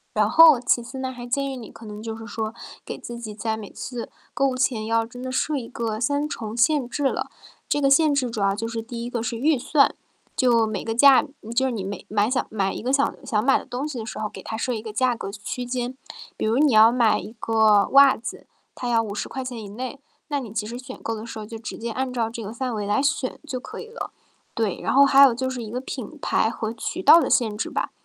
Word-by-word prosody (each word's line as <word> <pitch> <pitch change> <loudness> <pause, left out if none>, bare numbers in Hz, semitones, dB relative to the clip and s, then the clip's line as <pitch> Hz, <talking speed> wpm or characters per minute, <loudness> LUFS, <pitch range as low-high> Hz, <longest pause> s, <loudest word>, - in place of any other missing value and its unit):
然 210 -1 +3
后， 310 0 +8
其 240 -1 +2
次 260 +3 -9
呢， 260 0 -3
还 245 -1 -8
建 275 +2 -1
议 - - -5
你 230 - -9
可 225 - -13
能 210 0 -8
就 225 0 -5
是 225 - -9
说 220 -1 -4 0.3
给 - - -6
自 235 0 -8
己 215 -3 -7
在 220 0 -2
每 215 -2 -8
次 245 -2 -6 0.2
购 275 0 +2
物 255 -1 -2
前 245 -5 0
要 225 0 +2
真 245 +2 -11
的 255 0 -4
设 295 +3 0
一 240 -4 -3
个 225 -3 -3
3 285 +4 0
重 230 -4 -6
限 260 0 +3
制 290 - -3
了。 270 - 0 0.4
这 290 - +2
个 275 - +3
限 295 +2 +5
制 260 -4 0
主 215 -3 -3
要 195 0 +2
就 225 +2 -3
是 230 -1 -4
第 235 0 -7
一 245 - -6
个 235 - -2
是 230 0 -3
预 285 +1 +2
算， 280 +2 +3 0.4
就 235 -4 +3
每 215 - -3
个 225 0 -3
价 275 +1 +7 0.3
就 265 +1 +3
是 - - -1
你 210 -5 -3
每 195 0 -6
买 210 0 +2
想 255 +1 +1
买 195 -3 -1
一 - - -6
个 250 +3 -1
想 280 0 +2
想 220 -5 0
买 270 - +4
的 - - -11
东 260 +5 -3
西 265 -6 -5
的 220 - -5
时 - - -6
候， 215 - -2
给 - - -10
他 220 - -5
设 250 +2 -1
一 220 - -4
个 220 -1 -7
价 245 +2 +1
格 195 -3 -6
区 215 +4 -5
间。 245 +1 -3 0.4
比 - - -2
如 230 +3 +2
你 290 -4 +4
要 220 +2 +8
买 235 -3 +3
一 215 - -9
个 220 -2 +4
袜 275 0 +7
子， 230 - -8 0.3
他 245 - -5
要 230 -1 +3
¥50 245 +4 -5
以 210 - -8
内， 250 +6 -6 0.3
那 285 - 0
你 230 -6 -8
其 210 -1 -2
实 240 +3 -6
选 260 0 -10
购 225 - -2
的 220 +1 -6
时 230 - -8
候 215 - -6
就 225 +1 -8
直 220 - -7
接 230 0 -4
按 255 +1 -2
照 230 -2 0
这 230 0 -7
个 215 +2 -6
范 250 0 -3
围 210 -2 -3
来 210 +6 +2
选 280 -2 0
就 255 -4 -4
可 - - -8
以 450 - -9
了。 455 - -6 0.4
对， 220 -5 -1
然 - - -1
后 280 +1 +7
还 275 0 +6
有 260 -4 +7
就 260 +1 -2
是 255 -2 -4
一 215 - -7
个 250 +3 -4
品 265 +3 -7
牌 220 - +2
和 220 -1 -4
渠 330 +10 -5
道 335 - +9
的 - - 0
限 220 -4 +2
制 - - -2
吧。 - - -2
235 Hz, 285 characters per minute, -24 LUFS, 220-260 Hz, 0.4 s, 道